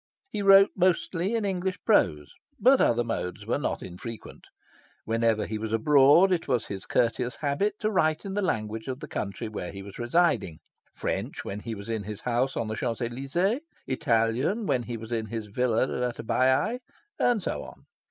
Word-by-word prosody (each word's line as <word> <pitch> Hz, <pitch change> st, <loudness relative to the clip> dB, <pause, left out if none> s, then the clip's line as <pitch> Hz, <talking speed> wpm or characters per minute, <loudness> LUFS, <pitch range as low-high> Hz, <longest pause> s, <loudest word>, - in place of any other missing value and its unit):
He 210 Hz, -, -2 dB
wrote 195 Hz, 0 st, +7 dB
mostly 185 Hz, +2 st, +1 dB
in 225 Hz, -2 st, 0 dB
English 190 Hz, -1 st, -1 dB
prose; 75 Hz, -, +2 dB, 0.3 s
but 255 Hz, +5 st, +5 dB
other 120 Hz, 0 st, +3 dB
modes 105 Hz, -3 st, -4 dB
were 120 Hz, +5 st, 0 dB
not 145 Hz, -, -2 dB
infrequent. 105 Hz, +6 st, -9 dB, 0.6 s
Whenever 115 Hz, -1 st, +1 dB
he 110 Hz, 0 st, -4 dB
was 110 Hz, 0 st, -4 dB
abroad, 145 Hz, -, +5 dB
it 175 Hz, -3 st, 0 dB
was 120 Hz, -3 st, +1 dB
his 95 Hz, -1 st, -7 dB
courteous 120 Hz, +1 st, 0 dB
habit 150 Hz, +9 st, 0 dB
to 215 Hz, -, +1 dB
write 155 Hz, -4 st, +1 dB
in 195 Hz, -, -4 dB
the 205 Hz, -, 0 dB
language 110 Hz, -, -2 dB
of 130 Hz, 0 st, -4 dB
the 150 Hz, -, -7 dB
country 105 Hz, -2 st, -4 dB
where 105 Hz, -5 st, -5 dB
he 100 Hz, 0 st, -8 dB
was 100 Hz, +2 st, -11 dB
residing 120 Hz, -, +1 dB, 0.4 s
French, -, -, -3 dB
when 100 Hz, -, -4 dB
he 115 Hz, +1 st, -5 dB
was 100 Hz, 0 st, -9 dB
in 115 Hz, -2 st, -2 dB
his 105 Hz, 0 st, -7 dB
house 125 Hz, +2 st, 0 dB
on 115 Hz, -, -1 dB
the 110 Hz, -, -3 dB
Champs 115 Hz, +1 st, -2 dB
Elysees; 135 Hz, -, -1 dB, 0.2 s
Italian, 130 Hz, -, +1 dB
when 125 Hz, -, +1 dB
he 120 Hz, 0 st, -5 dB
was 110 Hz, +1 st, -9 dB
in 110 Hz, -2 st, -1 dB
his 110 Hz, -1 st, -5 dB
villa 115 Hz, +2 st, +1 dB, 0.3 s
at 120 Hz, -, -9 dB
Baiae; 130 Hz, -, +2 dB, 0.4 s
and 235 Hz, -6 st, +2 dB
so -, -, -2 dB
on. -, -, -13 dB
125 Hz, 185 wpm, -27 LUFS, 110-180 Hz, 0.6 s, wrote